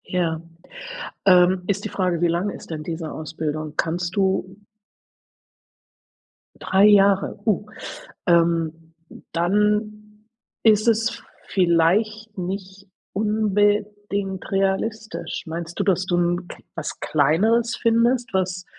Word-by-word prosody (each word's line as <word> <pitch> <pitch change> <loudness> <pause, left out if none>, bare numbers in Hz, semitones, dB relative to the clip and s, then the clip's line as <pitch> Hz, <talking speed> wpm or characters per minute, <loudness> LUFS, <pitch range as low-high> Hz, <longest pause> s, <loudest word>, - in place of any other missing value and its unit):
Ja, 165 -3 -1 0.9
ähm, 180 0 +5
ist 200 0 -1
die - - -2
Frage, 180 -4 -1
wie 175 - +3
lange 175 +5 -1
ist - - -11
denn 155 -2 -4
diese 160 -1 -4
Ausbildung? 155 -1 -4
Kannst 175 +2 -1
du 190 -1 0 2.0
3 195 +2 +3
Jahre, 200 0 +4
uh, 210 -2 +1 0.6
ähm, 165 -1 +1 0.4
dann 210 +4 0 0.4
ist 215 0 +4
es 225 0 +1 0.2
vielleicht 200 +5 +1
nicht 190 +1 -6 0.3
unbedingt 205 -2 0
realistisch. 200 +3 -2
Meinst 165 +2 -6
du, - - +2
dass 185 -2 +1
du 175 -1 0
'n 175 +1 0
K - - -10 0.2
was - - -5
Kleineres 215 - +2
findest, 235 0 +2
was 185 -1 -1
190 Hz, 110 wpm, -23 LUFS, 170-210 Hz, 2.0 s, ähm